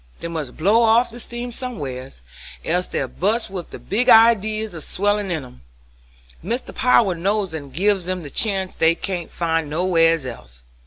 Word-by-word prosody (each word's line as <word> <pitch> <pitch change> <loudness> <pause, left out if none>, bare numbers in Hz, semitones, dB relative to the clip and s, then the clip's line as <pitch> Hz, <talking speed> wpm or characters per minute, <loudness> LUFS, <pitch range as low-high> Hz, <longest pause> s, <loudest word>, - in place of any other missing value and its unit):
They - - -5
must 155 -6 -5
blow 205 +8 +3
off 230 +2 +4
their 240 - -10
steam 240 +1 -6
somewheres, 135 - -6 0.4
else 180 +2 0
they'd - - -4
bust 210 +3 0
with 180 -3 -6
the - - -8
big 245 +6 0
idees 220 -2 +5
a 165 - -6
swellin' 205 +4 -1
in 160 -6 -3
'em; 65 - -16 0.8
Mr. 235 +8 -4
Power 235 -6 +3
knows 195 +1 -1
it - - -2
and 140 -3 -10
gives 190 +4 +1
'em 185 -2 -2
the 145 - -9
chance 195 -1 -1
they 165 +1 +3
can't 175 -2 -4
find 165 -3 -1
nowheres 165 -2 +2
else. - - -9
185 Hz, 175 wpm, -21 LUFS, 160-215 Hz, 0.8 s, idees